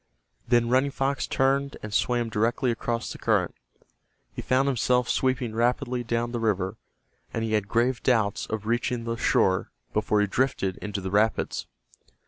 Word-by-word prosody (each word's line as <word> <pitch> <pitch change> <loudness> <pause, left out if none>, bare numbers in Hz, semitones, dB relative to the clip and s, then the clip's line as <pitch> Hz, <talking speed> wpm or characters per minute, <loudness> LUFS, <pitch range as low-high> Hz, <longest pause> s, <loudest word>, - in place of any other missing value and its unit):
Then 120 -1 +3
Running 130 +3 +3
Fox 135 0 -1
turned 140 +1 +1
and 105 -1 -6
swam 120 0 +1
directly 115 +4 +1
across 115 0 -2
the - - -8
current. - - +1 0.8
He - - -5
found 130 +2 +2
himself 125 -1 +2
sweeping 130 -3 0
rapidly 125 +2 0
down 120 +1 -1
the 120 - -2
river, 95 -4 0 0.6
and 115 - -2
he 110 -1 -1
had 105 -2 +1
grave 120 +3 +1
doubts 110 -5 +1
of 110 -1 -4
reaching 120 +1 0
the 115 0 -2
shore 95 -4 +2 0.2
before 105 0 +1
he 105 - +4
drifted 100 -4 0
into 105 -1 -4
the 95 0 -4
rapids. 105 +2 +1
115 Hz, 160 wpm, -26 LUFS, 110-125 Hz, 0.8 s, he